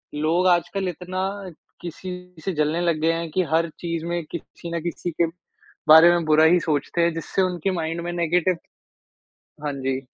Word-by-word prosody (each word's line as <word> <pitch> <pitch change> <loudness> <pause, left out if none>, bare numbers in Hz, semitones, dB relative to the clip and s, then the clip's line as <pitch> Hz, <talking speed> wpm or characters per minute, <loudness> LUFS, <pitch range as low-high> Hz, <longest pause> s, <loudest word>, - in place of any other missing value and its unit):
लोग 165 +5 +2
आजकल 185 +2 +1
इतना 185 +2 -4 0.6
किसी 175 +2 -7 0.3
से 190 - -1
जलने 155 +3 +1
लग 165 -3 0
गए 165 +1 +3
हैं, 165 0 -3
कि 185 - +1
हर 165 0 +2
चीज़ 165 -1 -3
में 170 -1 -2
किसी 170 0 -8
न 165 - -2
किसी 175 0 -3
के 170 +2 +1 0.6
बारे 160 +2 +9
में 170 -2 +1
बुरा 155 0 +5
ही 175 +2 +5
सोचते 155 +2 -1
हैं, 170 -1 +2
जिससे 165 +3 -1
उनके 180 +1 -1
माइंड 165 +1 -3
में 175 +1 -4
नेगेटिव 175 +1 +1 1.1
हाँ 145 - -1
जी। 135 -1 -2
170 Hz, 180 wpm, -23 LUFS, 160-175 Hz, 1.1 s, बारे